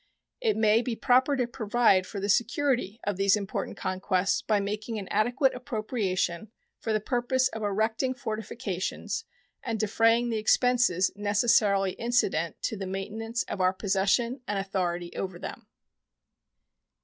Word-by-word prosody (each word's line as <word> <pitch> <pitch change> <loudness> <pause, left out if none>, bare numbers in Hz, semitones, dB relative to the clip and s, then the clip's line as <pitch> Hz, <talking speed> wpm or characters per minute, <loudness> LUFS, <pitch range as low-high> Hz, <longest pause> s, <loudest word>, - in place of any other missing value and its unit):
It 450 -3 +1
may 220 +1 +4
be 245 -2 -3
proper 260 +4 +3
to 250 - +1
provide 220 -5 +2
for 200 - -6
the 200 - -2
security 235 0 +1
of 205 -2 -2
these 195 +1 +4
important 200 -2 -4
conquests 185 0 0
by 215 -2 +1
making 210 +3 -3
an 200 -3 -5
adequate 245 +5 +2
appropriation 215 -6 -2 0.3
for 225 - -3
the 215 - +2
purpose 250 +3 +1
of 220 - -7
erecting 220 +5 0
fortifications 220 -5 -4 0.4
and 225 -3 -3
defraying 225 +3 +3
the 220 - 0
expenses 235 -5 +3
necessarily 205 -1 +2
incident 190 -8 0
to 225 - -1
the 195 -2 -5
maintenance 220 +5 -3
of 190 - -5
our 185 0 +3
possession 205 +6 0
and 205 - -1
authority 180 -3 -2
over 185 -2 -4
them. - - -8
215 Hz, 140 wpm, -28 LUFS, 195-240 Hz, 0.4 s, may